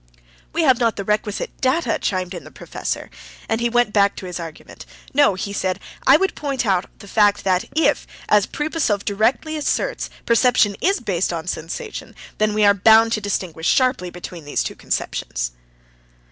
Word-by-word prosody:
"We 330 - 0
have 260 -5 +4
not 230 -2 +2
the 200 - -4
requisite 210 0 -1
data," 265 +6 +1
chimed 185 -2 -2
in 175 - -7
the - - -12
professor, - - -5 0.4
and 225 +1 -1
he 240 - +2
went 240 -2 +2
back 200 -1 +3
to - - -8
his 180 -1 -5
argument. 165 -2 -10 0.3
"No," 285 -8 +4
he 200 +2 -4
said; 185 -2 -1 0.3
"I 270 - +8
would 385 +3 0
point 275 -4 -2
out 190 -3 +2
the 200 - -13
fact 205 0 +3
that 185 -1 +1
if, 320 - +2 0.2
as 210 -2 +4
Pripasov 295 -10 -1
directly 230 +9 0
asserts, 300 - -1 0.2
perception 230 -3 +3
is 390 -2 +2
based 190 -6 0
on 165 -1 -4
sensation, 180 - -6 0.2
then 215 0 +2
we 215 -1 +4
are 200 - +7
bound 220 +3 +5
to 215 - 0
distinguish 180 -5 -3
sharply 255 -8 +2
between 175 -1 -9
these 145 - -1
two - - -5
conceptions." - - -3
210 Hz, 175 wpm, -21 LUFS, 185-250 Hz, 0.4 s, I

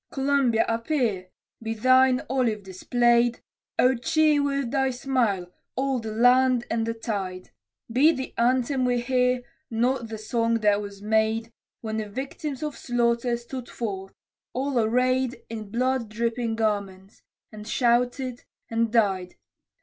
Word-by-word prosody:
Columbia, 270 -4 +2
appear! 230 -5 -1 0.3
Be 225 0 -3
thine 255 +2 +4
olive 235 -5 0
displayed, 240 +5 +1 0.3
O 255 +1 +5
cheer 305 +3 +2
with 275 -3 -1
thy 270 -1 +2
smile, 240 -9 -1 0.2
all 270 -1 0
the 220 -1 -5
land 245 +2 +4
and 225 0 0
the 230 - -2
tide! 195 -5 -4 0.4
Be 275 +7 +5
the 265 -4 -5
anthem 255 +2 +1
we 245 -1 +2
hear 250 0 +1 0.3
not 240 +1 0
the 220 0 -6
song 230 +1 0
that 205 -1 +3
was 200 -1 -9
made, 220 +1 +1 0.3
When 220 -1 -3
the 215 -1 -3
victims 270 +4 -5
of 300 -2 -3
slaughter 235 0 0
stood 240 +1 -8
forth, 195 -4 -5 0.4
all 265 0 0
arrayed 255 +3 +1
In 215 -2 -6
blood 250 +1 0
dripping 230 +1 -1
garments 200 -3 -3 0.3
and 215 -1 -10
shouted 245 +1 0 0.3
and 230 0 +1
died. 195 -6 +1
235 Hz, 135 wpm, -25 LUFS, 220-255 Hz, 0.4 s, O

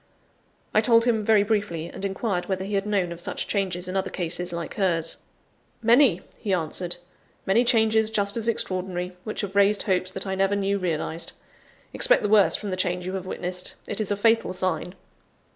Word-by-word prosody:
I 215 - +5
told 230 +1 +4
him 225 -3 +2
very 210 -1 +4
briefly, 205 -6 -1
and 180 - -9
inquired 195 -1 -2
whether 190 -1 -2
he 205 - -5
had 200 +1 0
known 195 -4 0
of 170 0 -6
such - - -2
changes 185 -3 -2
in 185 - -4
other 190 0 0
cases, 175 0 -3
like 170 -1 -5
hers. 165 -5 0 0.7
"Many," 235 - +5 0.2
he 195 -3 0
answered, 175 +1 -3 0.5
"many 210 +6 +4
changes 220 -2 +3
just 205 -2 +1
as 230 -1 0
extraordinary, 185 -4 -2
which 215 - -3
have 200 -1 -5
raised 200 +1 +4
hopes 185 -3 +1
that 190 +1 -4
I 190 - -2
never 195 +1 +1
knew 200 0 0
realised. 165 -2 -2 0.6
Expect - - +4
the 210 - 0
worst 200 -6 +5
from 205 -2 -5
the 185 - -2
change 180 -1 -1
you 185 - -4
have 190 -1 -4
witnessed; 180 0 -4
it 205 - -2
is 210 - -2
a 205 - 0
fatal 225 -1 +2
sign." 180 -1 -2
195 Hz, 195 wpm, -25 LUFS, 180-210 Hz, 0.7 s, I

